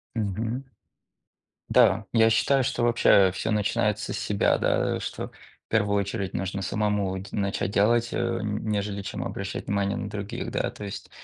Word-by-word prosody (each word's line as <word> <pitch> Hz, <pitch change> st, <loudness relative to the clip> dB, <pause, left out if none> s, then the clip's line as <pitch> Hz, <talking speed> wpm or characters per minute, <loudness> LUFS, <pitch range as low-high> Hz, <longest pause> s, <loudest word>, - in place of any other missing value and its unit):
Мгм. 115 Hz, +5 st, -2 dB, 1.1 s
Да, 100 Hz, +2 st, +4 dB
я 115 Hz, -1 st, +5 dB
считаю, 135 Hz, +3 st, +3 dB
что 120 Hz, -, -1 dB
вообще 110 Hz, -5 st, +5 dB
всё 110 Hz, +4 st, -2 dB
начинается 105 Hz, 0 st, 0 dB
с -, -, -2 dB
себя, 100 Hz, -1 st, +2 dB
да, -, -, +1 dB
что -, -, -5 dB
в -, -, -22 dB
первую 100 Hz, -2 st, +2 dB
очередь 100 Hz, -1 st, -3 dB
нужно 95 Hz, +1 st, -2 dB
самому 105 Hz, -2 st, 0 dB
дь 95 Hz, +1 st, -10 dB
начать 100 Hz, -1 st, -1 dB
делать, 115 Hz, +3 st, +3 dB
э, -, -, -2 dB
н 105 Hz, -3 st, -1 dB
нежели 100 Hz, -1 st, -1 dB
чем 100 Hz, -, -5 dB
обращать -, -, -4 dB
внимание 100 Hz, 0 st, 0 dB
на 100 Hz, -, -4 dB
других, 100 Hz, -1 st, -5 dB
да. -, -, -1 dB
То 105 Hz, -, -9 dB
есть, 100 Hz, -, -7 dB
105 Hz, 165 wpm, -26 LUFS, 100-110 Hz, 1.1 s, я